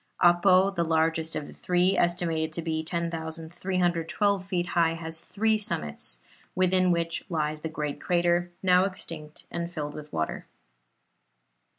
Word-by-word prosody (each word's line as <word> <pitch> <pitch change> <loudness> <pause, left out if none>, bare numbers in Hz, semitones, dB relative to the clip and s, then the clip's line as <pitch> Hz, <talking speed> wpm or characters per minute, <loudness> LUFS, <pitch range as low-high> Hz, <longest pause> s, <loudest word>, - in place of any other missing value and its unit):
Apo, 185 +2 +5
the 175 -3 0
largest 160 0 +1
of 150 - -3
the - - -11
three, 180 +2 +2
estimated 165 -2 +1
to 170 - -2
be 160 -1 -1
10,312 170 +3 -1
feet 180 -3 0
high, 165 -2 +2
has 160 0 -3
three 220 +1 +1
summits, 75 - -2 0.4
within 185 0 +3
which 170 -1 0
lies 155 -2 -1
the 160 - -3
great 150 -2 -4
crater, 175 0 +2
now 180 0 +5
extinct 160 -5 -6
and 170 0 -3
filled 150 -3 -4
with 150 0 -9
water. 80 - -3
170 Hz, 135 wpm, -27 LUFS, 160-180 Hz, 0.4 s, Apo